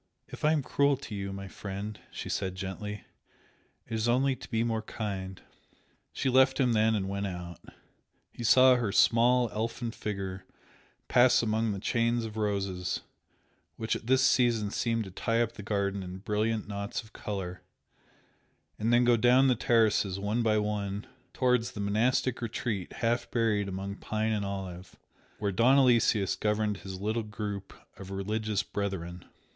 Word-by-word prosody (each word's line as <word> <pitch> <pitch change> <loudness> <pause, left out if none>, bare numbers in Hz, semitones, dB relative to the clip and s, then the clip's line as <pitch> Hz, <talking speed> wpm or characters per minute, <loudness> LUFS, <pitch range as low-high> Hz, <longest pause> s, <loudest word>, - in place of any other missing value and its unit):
"If - - -10
I 150 - +5
am 155 -3 +1
cruel 140 +1 +2
to 110 - -9
you, 100 -1 -4
my 100 0 -6
friend" 100 +2 -6
she - - -7
said, 95 -2 -2
gently, 105 +2 -5 0.8
"it - - -8
is 110 +1 0
only 130 +2 +2
to - - -12
be 115 -1 +1
more 115 -1 -1
kind!" 95 -4 -5 0.7
She 135 - -2
left 130 +1 +4
him 125 -3 +3
then 110 0 +3
and 95 -2 -1
went 100 +1 -2
out. 90 -2 -7 0.7
He 120 - -8
saw 130 +2 +6
her 115 -5 -1
small, 120 +3 +4
elfin 115 +2 -3
figure 95 -4 -5 0.6
pass 125 0 +5
among 110 0 +1
the 100 - -3
chains 115 +2 +1
of 110 -1 -7
roses 100 -4 -2 0.7
which 110 -1 -1
at 110 - -7
this 130 +1 +4
season 120 -5 +3
seemed 115 0 0
to 95 - -9
tie 115 +5 0
up 120 -1 +1
the 115 - -10
garden 100 -1 -1
in 90 0 -7
brilliant 105 +2 -1
knots 100 +2 -4
of 110 - -19
colour, 95 -3 -5 1.2
and 110 +2 +1
then 120 +1 +5
go 120 0 +5
down 125 +3 +5
the 125 - +4
terraces, 110 -5 +2
one 105 +4 0
by 110 -2 +2
one, 105 -1 -2 0.3
towards 125 -2 +1
the - - -7
monastic 115 +5 +1
retreat 110 -4 -3
half 120 0 -1
buried 110 -4 +1
among 100 +1 -5
pine 110 +1 -1
and 105 -2 -1
olive, 95 -2 -6 0.4
where 100 -1 -1
Don 120 +8 +4
Aloysius 115 -6 +4
governed 105 -1 0
his 95 0 -8
little 110 +3 -1
group 105 -2 -5 0.3
of 95 - -9
religious 105 +2 -1
brethren. 90 -4 -4
105 Hz, 165 wpm, -29 LUFS, 100-115 Hz, 1.2 s, saw